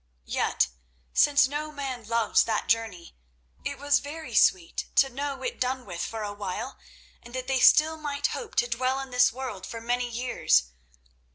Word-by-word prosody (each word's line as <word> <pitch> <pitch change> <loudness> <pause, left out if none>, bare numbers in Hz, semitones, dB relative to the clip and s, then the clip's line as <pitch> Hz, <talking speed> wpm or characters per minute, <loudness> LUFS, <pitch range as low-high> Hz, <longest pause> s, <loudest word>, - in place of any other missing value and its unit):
Yet, 60 - +1 0.4
since 285 -2 +5
no 300 +2 -4
man 270 -5 -5
loves 230 +1 +3
that 220 -2 -1
journey, 220 - -1 0.5
it - - -4
was 285 +1 +2
very 290 -3 -8
sweet 180 -5 +2
to 270 - +5
know 275 +1 -4
it 250 - -4
done 255 0 -1
with 175 0 -6
for 225 -1 -4
a 205 -1 -4
while, 205 +6 -5 0.4
and 240 +1 -11
that 255 -1 -3
they 265 0 +1
still 315 +5 +6
might 290 -2 -3
hope 465 -3 -3
to 240 - +2
dwell 255 +3 0
in 270 -1 -7
this 250 0 +4
world 235 -6 -6
for 230 - -6
many 245 +1 -1
years. 230 - +1
250 Hz, 175 wpm, -27 LUFS, 225-275 Hz, 0.5 s, still